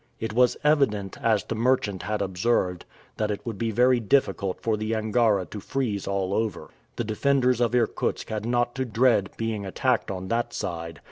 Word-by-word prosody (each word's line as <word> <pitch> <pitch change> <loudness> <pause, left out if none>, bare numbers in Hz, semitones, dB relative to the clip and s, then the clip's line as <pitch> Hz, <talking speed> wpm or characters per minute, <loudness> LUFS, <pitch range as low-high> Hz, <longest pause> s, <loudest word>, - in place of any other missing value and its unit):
It 110 -1 -3
was 125 +1 +3
evident, 135 -10 +2
as 110 -4 +2
the - - -4
merchant 110 -5 +1
had 105 +3 -2
observed, 95 -1 0 0.3
that 105 -1 0
it 105 - -4
would 110 -5 -5
be 115 - 0
very 125 +3 +4
difficult 105 -5 +1
for 110 -1 0
the 110 +1 -2
Angara 110 -3 +2
to 105 - -8
freeze 110 -4 -2
all 100 -1 -1
over. 110 0 -2 0.2
The - - -2
defenders 125 +2 +1
of 120 0 +2
Irkutsk 120 -3 0
had 110 -1 -3
not 120 +1 0
to 130 - 0
dread 115 -4 +2
being 115 -2 -2
attacked 120 +5 0
on 95 -1 -4
that 120 0 -1
side. 85 -1 -5
110 Hz, 185 wpm, -26 LUFS, 100-120 Hz, 0.3 s, very